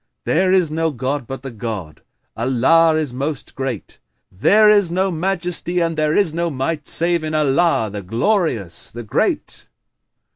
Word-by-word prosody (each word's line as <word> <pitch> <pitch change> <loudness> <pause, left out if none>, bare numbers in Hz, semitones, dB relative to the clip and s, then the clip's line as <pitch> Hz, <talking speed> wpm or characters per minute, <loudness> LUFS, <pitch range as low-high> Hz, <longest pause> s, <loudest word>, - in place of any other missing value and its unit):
There 185 +3 +2
is 180 -5 +3
no 160 +1 0
god 135 -1 -3
but 135 0 -7
the 135 - -6
God! 105 -9 -6 0.3
Allah 135 +7 +3
is 155 -5 -1
Most 140 +2 -4
Great! 130 -5 -5 0.3
There 210 - +4
is 205 -4 +5
no 190 +2 0
Majesty 180 0 -1
and 165 -1 0
there 155 0 0
is 195 -7 +2
no 170 +1 -1
Might 150 +2 -3
save 170 -1 +2
in 155 0 -3
Allah, 150 - +2
the 105 0 -5
Glorious, 115 - 0
the 120 +1 -8
Great!" 110 - -1
155 Hz, 155 wpm, -19 LUFS, 125-170 Hz, 0.3 s, is